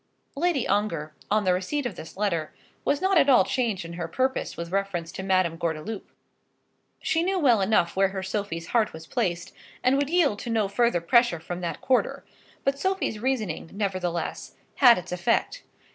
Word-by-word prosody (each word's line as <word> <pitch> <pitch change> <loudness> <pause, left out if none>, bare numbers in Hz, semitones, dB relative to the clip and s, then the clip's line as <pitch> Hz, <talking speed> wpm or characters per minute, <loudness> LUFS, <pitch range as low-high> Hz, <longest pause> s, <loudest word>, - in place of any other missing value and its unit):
Lady 310 -3 +1
Ongar, 165 -8 -1 0.2
on 215 +1 +2
the 185 -2 +3
receipt 245 +11 -2
of 245 - -3
this 160 - -10
letter, 170 -7 -1 0.3
was 285 +4 0
not 380 -2 +4
at 285 - +4
all 255 - +7
changed 230 -9 -1
in 170 - -7
her 170 -1 -4
purpose 260 +9 -1
with 170 0 -5
reference 190 -4 -2
to - - -6
Madame 185 -3 +1
Gordeloup. 170 +5 -4 0.9
She 320 +1 +1
knew 380 +2 0
well 250 - +4
enough 190 -4 +2
where 195 +1 +4
her 190 0 -5
Sophie's 190 -4 -4
heart 225 -3 +2
was 160 0 -9
placed, 170 +1 -2 0.3
and 255 +2 +4
would 285 0 0
yield 315 -11 +2
to - - -6
no 220 -3 +1
further 220 -2 +1
pressure 235 +1 +3
from 175 +2 -6
that 170 - -4
quarter; 260 -1 +1 0.4
but 275 0 0
Sophie's 380 - -1
reasoning, 220 -10 -2
nevertheless, 185 -4 -3 0.2
had 245 -4 +7
its 180 - -7
effect. 180 - 0
205 Hz, 180 wpm, -26 LUFS, 175-260 Hz, 0.9 s, all